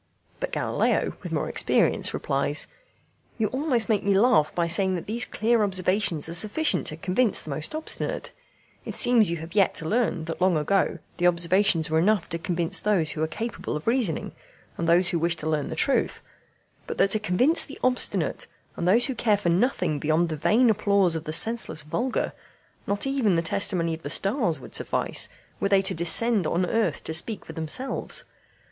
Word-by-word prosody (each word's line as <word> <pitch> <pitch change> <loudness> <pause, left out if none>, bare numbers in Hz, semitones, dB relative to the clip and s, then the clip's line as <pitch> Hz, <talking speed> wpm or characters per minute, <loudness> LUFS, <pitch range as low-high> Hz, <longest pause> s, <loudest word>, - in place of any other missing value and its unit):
But - - -4
Galileo, - - -1
with - - -8
more - - -2
experience, - - +1
replies: - - 0 0.7
"You 220 -3 0
almost 260 -4 0
make 210 -4 0
me 200 0 +1
laugh 195 -9 +3
by 170 - +1
saying 185 +3 +2
that 170 - -6
these 230 +3 -1
clear 230 +1 0
observations 185 -4 +1
are 165 - -6
sufficient 215 - 0
to 155 - -3
convince 195 +6 +1
the 155 - -7
most 155 - -4
obstinate; 320 +10 -3 0.5
it - - -2
seems 235 -5 +4
you 170 - -2
have 165 +1 -9
yet 200 -2 +2
to 160 - -4
learn 210 -6 -1
that 165 +2 -6
long 185 -3 +3
ago 175 +5 0 0.2
the 175 - +2
observations 175 0 +2
were 160 - +2
enough 200 +1 +1
to 165 -1 -2
convince 170 -1 0
those 190 -7 +1
who 155 - -5
are 160 - +1
capable 225 0 -5
of 150 - -6
reasoning, 230 - 0 0.4
and 170 - -3
those 175 +2 +4
who 170 - -1
wish 165 +1 +2
to 155 -1 -5
learn 155 -2 -1
the - - -5
truth; 275 - 0 0.6
but - - -5
that 195 - +2
to 215 - +1
convince 220 - +1
the 290 - -10
obstinate, 255 0 +1 0.3
and 170 - -3
those 230 +6 +5
who 265 - -2
care 215 -4 +1
for 200 -4 -2
nothing 175 - 0
beyond 160 +3 +1
the 155 - -3
vain 225 - +3
applause 200 -4 +2
of 160 0 -5
the 155 - -4
senseless 195 -3 +1
vulgar, 240 - -2 0.5
not 200 +4 +1
even 265 -9 +1
the 165 - 0
testimony 170 -1 +1
of 160 - -7
the 145 - -6
stars 195 - +1
would - - -13
suffice, - - 0 0.3
were 200 - -1
they 195 -1 +3
to 190 - -1
descend 195 +5 +3
on 180 +2 0
earth 215 -5 -1
to 160 - -3
speak 200 +6 +1
for - - -9
themselves. 165 - -1
190 Hz, 195 wpm, -25 LUFS, 165-225 Hz, 0.7 s, those